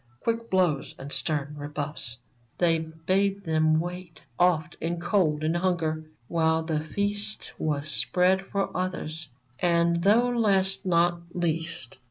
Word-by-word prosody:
Quick 230 0 -1
blows 180 -7 +1
and 140 +1 -8
stern 150 -2 -2
rebuffs. 145 -4 -4 0.4
They 165 -2 +3
bade 185 +5 0
them 155 -2 +3
wait, 175 0 -6 0.2
Often 175 -2 +2
in 170 +1 -1
cold 170 -4 +1
and 160 +2 +1
hunger, 165 -3 0 0.2
while 160 -1 +2
the 160 -2 -1
feast 205 +6 -2
Was 150 -1 -1
spread 180 +4 +2
for 200 -1 -2
others, 160 -4 -3 0.3
and, 170 -1 +2
though 220 +6 +4
last 195 -4 +2
not 175 0 +3
least. 165 -8 -1
170 Hz, 130 wpm, -27 LUFS, 155-185 Hz, 0.4 s, though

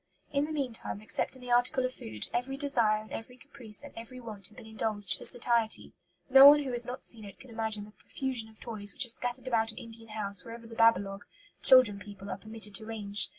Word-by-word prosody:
In 280 0 +1
the 310 - -7
meantime, 260 -9 -4
except 215 +4 0
in 260 - -14
the 245 - -6
article 245 +2 +3
of 255 - -3
food, 110 - -6
every 255 +3 -2
desire 230 -7 +1
and 215 - -17
every 250 +3 -8
caprice 245 -7 -6
and - - -11
every 245 +3 -9
want 215 -6 -6
had 215 - -21
been - - -11
indulged 220 -3 0
to - - -6
satiety. 235 -2 0 0.3
No 270 +1 +9
one 295 0 +7
who 265 - -4
has 240 -1 +3
not 250 +1 -7
seen 225 -2 -10
it 200 -2 -12
could 255 - -14
imagine 220 -2 -3
the 210 - -15
profusion 245 0 -4
of 220 - -21
toys 205 -3 0
which 280 - +1
are - - -5
scattered 245 +2 0
about 225 -2 +1
an - - -15
Indian 225 -1 -12
house 200 -3 -4
wherever 230 0 -10
the 230 - -12
'babalogue' 200 -3 +2 0.3
(children 255 -6 +8
people) 200 -1 -10
are 185 - -4
permitted 215 -1 -2
to 215 +2 -2
range. 210 -2 +2
225 Hz, 230 wpm, -30 LUFS, 210-250 Hz, 0.3 s, No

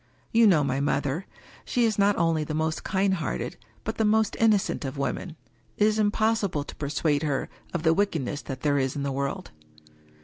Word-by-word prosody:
You 230 0 +6
know 165 -7 +5
my 135 -1 0
mother: 145 +4 -1 0.4
she 240 -1 +1
is 220 -2 0
not 200 0 +4
only 165 -2 +2
the 155 0 -4
most 160 0 -1
kind 190 0 +1
hearted, 170 -5 -3 0.3
but 220 - -4
the - - +3
most 215 0 +3
inno 220 -3 +5
cent - - -4
of 135 0 -5
women 155 +4 -3 0.2
— - - -37
it 210 - +4
is 215 0 +2
impossible 210 -6 +1
to - - -10
persuade 145 0 0
her 145 -4 -1 0.2
of 170 - -3
the 160 -1 +4
wickedness 160 -7 -1
that 130 -2 -7
there 145 -2 +2
is 130 -1 -1
in 140 - -2
the 140 - -1
world. 140 +8 -3
160 Hz, 205 wpm, -26 LUFS, 145-205 Hz, 0.4 s, You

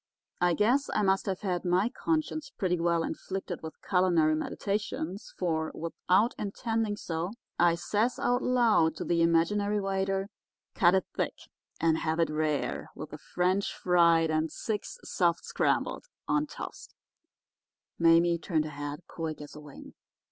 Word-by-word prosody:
"I 175 -1 +3
guess 245 +7 +2
I 210 - +2
must 195 0 +2
have 190 -1 -2
had 180 -4 -1
my 180 +3 +2
conscience 310 +2 -2
pretty 180 -9 -1
well 170 0 +2
inflicted 190 -1 -5
with 160 0 -8
culinary 175 -5 +3
meditations, 195 +2 -3
for, 160 -3 -1
without 185 +7 +1
intending 220 +1 -1
to - - -13
do - - -11
so, 165 +2 -2 0.3
I 170 -1 +5
says, 210 +8 0
out 245 +1 +1
loud, 225 -11 +3
to - - -4
the 170 -1 +1
imaginary 200 +5 +2
waiter, 195 0 -1 0.4
'Cut 180 -2 +4
it 190 - +1
thick - - -1 0.4
and 160 -1 +2
have 160 +1 -1
it 165 -2 +2
rare, 155 -1 -1
with - - -8
the - - -8
French 185 +3 0
fried, 170 -2 +4
and 155 0 0
six, 210 +3 -4
soft 170 -2 0
scrambled, - - 0 0.2
on 300 0 +1
toast.' - - -9 1.0
"Mame 170 0 +5
turned 160 -2 0
her 155 - -6
head 145 +3 -6
quick 160 -2 -5
as 150 0 -10
a - - -8
wing. 150 -2 -12
180 Hz, 155 wpm, -29 LUFS, 165-205 Hz, 1.0 s, I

